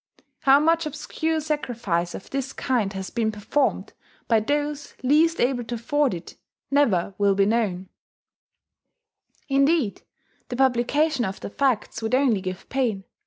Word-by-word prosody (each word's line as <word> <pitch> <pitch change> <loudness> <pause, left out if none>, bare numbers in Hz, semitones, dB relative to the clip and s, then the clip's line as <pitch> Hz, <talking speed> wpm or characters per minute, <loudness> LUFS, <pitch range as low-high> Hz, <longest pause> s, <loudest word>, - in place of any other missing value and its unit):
How 275 0 +6
much 330 +1 +2
obscure 320 +2 -2
sacrifice 235 - -2
of - - -10
this 270 0 -3
kind 235 -7 0
has 190 -1 -5
been 225 -2 0
performed 220 +7 -1 0.3
by 225 -2 +4
those 290 +4 -2
least 315 +5 +3
able 245 0 +1
to 240 - -4
afford 290 -1 0
it 170 - -10 0.3
never 210 -10 +2
will 200 -1 +3
be 195 0 +3
known: 200 -4 0 1.6
indeed, 275 -4 +2 0.5
the 245 - -3
publication 265 +3 +2
of 195 -2 -3
the - - -7
facts 245 -4 0
would 225 +3 +1
only 255 -7 +2
give 185 0 -6
pain. 235 -7 -1
250 Hz, 140 wpm, -24 LUFS, 205-290 Hz, 1.6 s, How